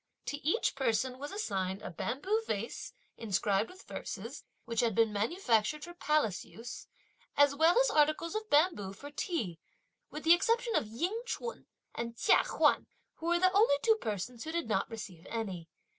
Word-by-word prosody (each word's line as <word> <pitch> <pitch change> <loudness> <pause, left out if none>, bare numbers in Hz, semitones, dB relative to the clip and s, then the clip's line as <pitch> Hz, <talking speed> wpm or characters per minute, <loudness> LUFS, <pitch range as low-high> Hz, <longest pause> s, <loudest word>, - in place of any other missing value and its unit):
To 290 - -3
each 325 +10 +1
person 255 +1 0
was 290 +1 -6
assigned 195 - -2
a - - -5
bamboo 285 - -1
vase, 215 +2 -4 0.2
inscribed 205 -1 +1
with 375 +1 -13
verses, - - -6 0.2
which 230 -1 -2
had 230 -4 +2
been 225 -2 +3
manufactured 230 - +1
for 345 - -8
palace 300 - +1
use, 235 +2 -9 0.5
as 285 0 +6
well 325 +8 +4
as - - +3
articles 310 +3 +2
of 435 0 -4
bamboo 290 - +3
for 285 +8 -10
tea; 225 - -3 0.5
with 300 - -7
the 325 +2 +8
exception 460 +6 +2
of - - +1
Ying 345 - -2
ch'un 470 0 -5 0.3
and 235 0 -5
Chia - - +5
Huan, - - +3 0.3
who 330 - -5
were 345 0 +4
the 370 +1 +3
only 405 -6 +5
two 445 -1 +5
persons 225 +2 -4
who 320 - -5
did 335 -4 -2
not 195 -3 0
receive 195 -7 -8
any. 190 -7 -4
280 Hz, 175 wpm, -32 LUFS, 215-345 Hz, 0.5 s, the